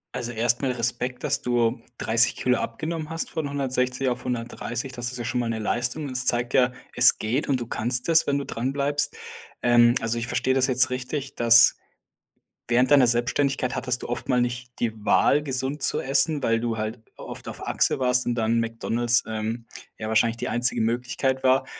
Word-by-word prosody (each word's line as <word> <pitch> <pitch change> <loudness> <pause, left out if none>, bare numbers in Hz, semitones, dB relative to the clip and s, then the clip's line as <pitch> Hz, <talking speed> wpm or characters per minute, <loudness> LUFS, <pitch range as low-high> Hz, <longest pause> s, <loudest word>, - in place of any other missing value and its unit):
Also 120 -1 -4
erst 120 +2 +1
mal 135 - 0
Respekt, 125 +1 -3
dass - - 0
du 120 -2 0 0.2
30 115 +2 +3
Kilogramm 125 -2 0
abgenommen 155 +6 -6
hast 165 0 -2
von 155 -3 -4
160 130 -1 -1
auf 125 0 -5
130. 120 +1 -4
Das 120 -1 -4
ist 125 - -7
ja 120 - -5
schon 125 +2 -2
mal 120 -1 -2
'ne 110 - -3
Leistung. 125 +7 -2
Das 125 -1 -1
zeigt 120 0 +2
ja, 125 -1 +3 0.2
es 125 0 +7
geht 120 +7 -2
und 130 -3 0
du - - -4
kannst 120 +6 -1
es, 165 -1 +4
wenn 140 0 +1
du 140 - -4
dran 130 +4 -3
bleibst. 145 +1 -1 0.5
Ähm, 120 0 +4
also, 115 +1 -1
ich 115 - -4
verstehe 125 +2 0
das 130 0 +3
jetzt 130 0 +4
richtig, 130 +2 -5
dass 115 -1 +6 0.9
während 125 +3 +2
deiner 135 -4 +6
Selbstständigkeit 125 +2 0
hattest 125 -2 -2
du - - -7
oft 120 - -5
mal 125 - +2
nicht 120 0 -4
die 115 -2 -1
Wahl, 145 +6 +3
gesund 135 +1 -2
zu - - +3
essen, 140 +1 +1
weil 115 0 +1
du 115 -1 -3
halt 110 +2 -4 0.2
oft - - -10
auf - - -8
Achse - - +1
warst 125 -1 +1
und 120 - 0
dann 115 0 0
McDonald's, 115 +1 0
ähm, 110 +1 -5 0.3
ja 110 - -5
wahrscheinlich 115 +1 +1
die - - -4
einzige 120 -1 +2
Möglichkeit 125 +3 -1
war 130 +1 +3
125 Hz, 200 wpm, -24 LUFS, 120-130 Hz, 0.9 s, es